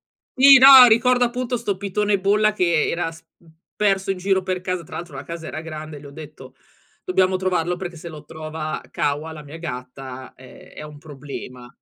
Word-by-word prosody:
Sì, 275 0 +5
no, 265 -1 +10
ricordo 245 +2 +3
appunto 245 0 -3
sto 205 -4 -3
pitone 200 +1 -1
bolla 210 +2 +2
che 170 -5 +1
era 170 -1 -2
s 165 0 -16
mhmm, 165 -2 -23 0.2
perso 195 -1 0
in 190 - -4
giro 190 0 0
per 185 -1 -4
casa. 185 -2 -4
Tra - - -11
l'altro 170 -5 -8
la 135 - -7
casa 165 0 -8
era 155 - -6
grande 155 -1 -8
e - - -11
le 145 - -12
ho - - -13
detto: 150 0 -12 0.5
“Dobbiamo 190 - +1
trovarlo 180 -2 -1
perché 175 -2 -7
se 170 - -10
lo 155 -2 -10
trova 155 0 -6
Kawa, 150 +3 -3
la 150 -1 -10
mia 150 +3 -11
gatta, 130 -3 -8
è 130 0 -16
è - - -9
un 150 -1 -11
problema", 140 -4 -10
170 Hz, 205 wpm, -21 LUFS, 150-200 Hz, 0.5 s, no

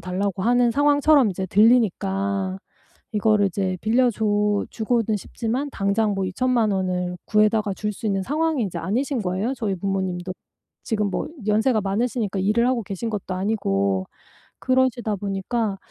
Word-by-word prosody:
달라고 185 +2 -2
하는 245 0 +3
상황처럼 290 -1 +4
이제 190 0 -4
들리니까 195 -2 +2 0.6
이거를 210 -1 +3
이제 185 0 -2
빌려 245 +3 +3
줘 210 -2 +1
주고는 225 -1 0
싶지만 240 +7 -3
당장 205 0 0
뭐 195 -1 -1
20,000,000 235 +2 +1
원을 180 -1 -1
구해다가 210 -1 +2
줄 210 +2 -3
수 220 - -6
있는 195 -2 0
상황이 310 +2 0
이제 190 - -4
아니신 255 +5 -1
거예요 190 +7 -1
저희 215 -6 -2
부모님도. 185 -1 -2 0.5
지금 210 -3 -1
뭐 - - -3 0.2
연세가 220 +2 +2
많으시니까 205 0 -1
일을 215 +5 +2
하고 250 -3 0
계신 200 +4 -4
것도 195 -3 -4
아니고 100 - 0 0.5
그러시다 255 -4 +1
보니까 200 +2 -2
210 Hz, 330 characters per minute, -23 LUFS, 195-235 Hz, 0.6 s, 상황처럼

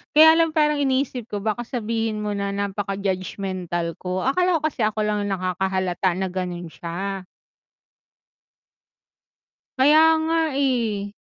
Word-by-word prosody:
Kaya 320 +1 +9
lang 330 0 +4
parang 300 -1 +3
iniisip 260 -3 0
ko 205 -1 -4
baka 220 +2 0
sabihin 225 -3 -2
mo 210 - -1
na 200 0 -2
napaka-judgemental 190 -3 -3
ko. 185 0 -2
Akala 355 +6 +2
ko - - -8
kasi 285 -5 -5
ako 215 0 -2
lang 210 0 0
'yong 195 - -1
nakakahalata 185 0 -1
na 190 0 -1
gano'n 180 -2 -4
siya. 180 +7 -5 2.5
Kaya 295 +4 +6 0.2
nga 330 +1 +1 0.2
eh. 225 -7 0
205 Hz, 125 wpm, -23 LUFS, 185-260 Hz, 2.5 s, Kaya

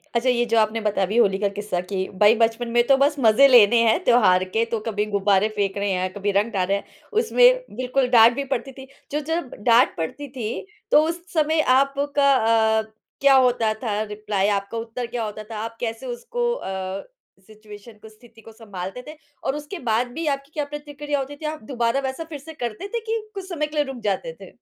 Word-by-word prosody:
अच्छा 235 +2 +2
ये 240 -1 +2
जो 230 - +3
आपने 220 +1 +1
बताया 205 -2 0
अभी 210 +5 -3
होली 200 -5 +4
का 205 - +1
किस्सा 205 -3 -3
कि 190 -1 -2
भाई 210 +2 +6
बचपन 230 +1 +1
में 240 0 +3
तो 275 - +6
बस 285 +2 +2
मज़े 235 +3 +6
लेने 235 -2 +6
हैं 220 - +2
त्योहार 185 -7 +4
के 225 +1 +2
तो 230 - 0
कभी 210 -1 -1
गुब्बारे 200 0 +2
फेंक 200 -1 -1
रहे 200 0 -1
हैं, 185 0 -1
कभी 205 0 -2
रंग 210 +3 +1
डाल 185 -2 0
रहे 200 +1 +1
हैं, - - -8 0.3
उसमें - - +4
बिल्कुल 255 +2 0
डाँट 235 -1 +7
भी 280 - -2
पड़ती 265 +2 -4
थी। 265 0 -12 0.2
जो 295 - 0
जब 325 -5 -2
डाँट 240 +2 +4
पड़ती 275 - -5
थी, 240 - -5 0.3
तो 300 - +7
उस 340 +1 -4
समय 315 0 +2 0.2
आपका 280 +1 +2
अ, 220 -1 +3 0.4
क्या 275 -1 +6
होता 245 -4 +3
था 210 -2 -1
रिप्लाई 210 -1 -1
आपका 200 +2 -2
उत्तर 230 +2 -5
क्या 240 -1 -4
होता 215 0 -6
था? 215 0 -8
आप 230 +1 -6
कैसे 230 +2 -4
उसको 475 - -3
अ, 190 - -5 0.4
सिचुएशन 215 +1 -13
को 220 - -12
स्थिति 225 +1 -19
को 225 - -14
संभालते 205 -1 -8
थे, 305 - -9 0.3
और 270 - -1
उसके 300 +5 -7
बाद 235 +3 +1
भी 330 +3 -4
आपकी 275 0 -2
क्या 295 -2 -2
प्रतिक्रिया 290 0 -5
होती 275 +2 -5
थी? 305 - -9
आप 305 -2 -4
दोबारा 235 +1 -1
वैसा 265 +5 -5
फिर 300 -3 -7
से 320 +4 -11
करते 240 - -5
थे 470 - 0
कि 450 0 -3
कुछ 385 -2 -7
समय 305 -4 -2
के 300 - -11
लिए 295 -1 +2
रुक 250 - -9
जाते - - -3
थे? - - -11
235 Hz, 220 wpm, -23 LUFS, 215-280 Hz, 0.4 s, डाँट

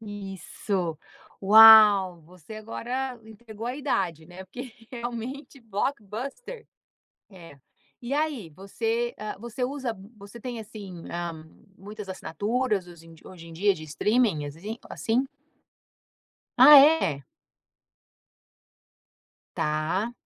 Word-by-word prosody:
Isso. 195 -4 -5 0.4
Uau, 205 -3 +8
você 180 +4 -14
agora 245 +3 -5
entregou 220 0 -10
a 250 - -3
idade, 170 - -2
né, 180 +2 -11
porque 245 +6 -9 0.2
realmente 245 +3 -7
Blockbuster. 245 - -5 0.7
É. 165 -6 -14 0.4
E, 245 +3 -4
aí, 290 - -2
você, 225 +7 -3
hã, 215 0 -5
você 235 +3 -5
usa 260 -3 -3 0.2
você 205 +4 -12
tem 240 0 -6
assim, 200 -6 -10
hã, 170 -2 -5 0.3
muitas 205 0 -10
assinaturas 205 +3 -2
os 170 -2 -14
em 165 0 -15
de 160 - -17
hoje 170 -3 -12
em 165 - -11
dia 200 +4 +2
de 155 - -10
streaming, 180 +1 0
azim 185 +11 -7
assim? 240 +4 -1 1.3
Ah 295 -1 +10
é? 270 - +4 2.3
Tá. 155 +9 -1
210 Hz, 110 wpm, -26 LUFS, 180-240 Hz, 2.3 s, Ah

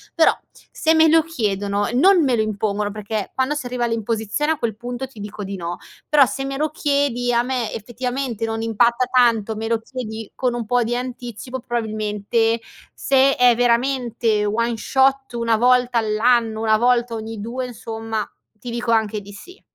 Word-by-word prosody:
Però, 325 - +4 0.4
se 320 +1 +2
me 320 0 +6
lo 325 +1 +5
chiedono 205 - -1
e 230 - -4
non 355 +7 +5
me 260 -4 +2
lo 220 - +1
impongono 210 -1 -1
perché, 210 0 -4
quando 260 +2 +1
si 295 -4 -4
arriva 245 0 -3
all'imposizione, 230 +6 -1
a - - -7
quel 230 -5 -2
punto 245 +3 -5
ti 260 -4 -15
dico 205 0 -7
di 195 0 -5
no; 175 -1 -5 0.3
però, 295 -2 +6
se 270 +2 -4
me 270 0 -4
lo 305 +1 -1
chiedi 280 -5 0
a 235 0 +2
me, 245 -3 -2
effettivamente, 245 +1 -4
non 225 0 -2
impatta 235 +2 +2
tanto, 235 -4 +2
me 220 +1 -4
lo 230 0 +1
chiedi 225 -3 -7
con 250 -2 -1
un 235 -1 -3
pò 245 +3 +2
di 235 +2 -1 0.2
anticipo, 245 +1 -7
probabilmente 225 -1 -1 0.4
se 275 0 +3
è 245 -1 +5
veramente 235 -2 +1
one 230 +3 0
shot, 270 +3 +1
1 230 -1 +1
volta 250 +1 +3
all'anno, 220 0 +1
1 220 -1 +3
volta 240 0 +2
ogni 220 0 -6
2, 245 +4 -4
insomma, 225 -2 -5 0.3
ti 230 +3 -10
dico 235 0 -2
anche 220 -2 +1
di 200 +1 -12
sì. 365 - -13
235 Hz, 180 wpm, -21 LUFS, 220-255 Hz, 0.4 s, me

